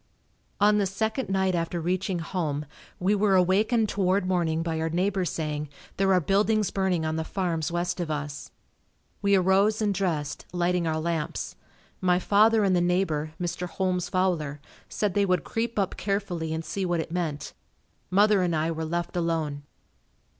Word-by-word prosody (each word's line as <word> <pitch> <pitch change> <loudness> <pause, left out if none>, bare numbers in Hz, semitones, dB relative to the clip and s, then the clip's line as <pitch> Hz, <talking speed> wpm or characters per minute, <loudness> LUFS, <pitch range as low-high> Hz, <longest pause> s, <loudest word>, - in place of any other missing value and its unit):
On 210 +1 +5
the 200 - +2
second 220 +6 -2
night 190 -1 +1
after 170 0 -1
reaching 185 +2 -1
home 160 -4 -2 0.3
we 190 +3 +2
were 205 -1 +3
awakened 210 +5 +3
toward 195 -1 +1
morning 170 -3 0
by 165 -1 -2
our 160 0 -1
neighbor 185 +3 0
saying, 150 -3 -3 0.3
"There 195 0 +3
are 185 - +5
buildings 205 +4 +2
burning 185 -4 0
on 155 0 -1
the 160 - -1
farms 170 -3 -2
west 175 +1 -1
of 170 -3 -2
us." 145 -1 -4 0.7
We 200 -1 +4
arose 195 +3 +3
and 210 -2 +1
dressed, 165 -7 -2
lighting 175 -1 0
our 160 0 0
lamps. 160 -1 -3 0.5
My 180 -1 +3
father 215 +4 +4
and 190 -2 +3
the 175 - +3
neighbor, 170 -4 0
Mr. 180 0 -3
Holmes 180 0 -1
Fowler, 170 -6 0 0.3
said 205 -3 -1
they 205 - +2
would 185 -2 +1
creep 230 0 -3
up 195 -2 0
carefully 190 -5 -2
and 160 0 -3
see 195 - -3
what 175 -2 0
it 160 - -4
meant. 165 -4 -3 0.6
Mother 205 +1 +4
and 175 -2 +1
I 160 +1 0
were 160 0 -3
left 170 +2 -3
alone. 165 -4 -1
180 Hz, 170 wpm, -26 LUFS, 165-195 Hz, 0.7 s, On